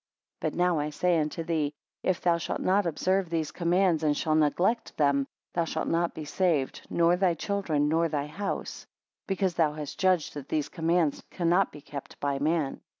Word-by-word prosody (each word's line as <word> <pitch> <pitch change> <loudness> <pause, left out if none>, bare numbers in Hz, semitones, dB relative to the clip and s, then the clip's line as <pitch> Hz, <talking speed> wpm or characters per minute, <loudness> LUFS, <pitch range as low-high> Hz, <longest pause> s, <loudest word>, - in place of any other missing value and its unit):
16 - - +1
But - - -10
now 175 -2 +3
I 150 +1 -1
say 170 +2 +1
unto 155 +2 -2
thee, 155 -3 -1 0.3
if 185 -2 0
thou 170 -1 +2
shalt - - -3
not 195 0 +2
observe 185 +3 0
these 160 -2 -1
commands, 175 -1 +2
and 150 -2 +2
shall 155 - 0
neglect 175 +9 +1
them, 140 -2 +2 0.3
thou 170 - +1
shalt 160 0 -3
not 170 +1 0
be 155 - -6
saved, 155 -4 0
nor 170 +1 +3
thy 180 -2 +2
children, 165 -5 0
nor 165 +2 +2
thy 145 -2 -1
house: 195 +7 -5 0.4
because 190 -2 0
thou 160 -3 +2
hast 150 -2 -7
judged 185 -4 +2
that 145 -2 -8
these 150 -2 -1
commands 165 -3 +1
cannot 175 +2 +2
be 150 - -11
kept 140 -1 -9
by 140 -1 -1
man. 155 -1 0
165 Hz, 190 wpm, -28 LUFS, 150-180 Hz, 0.4 s, now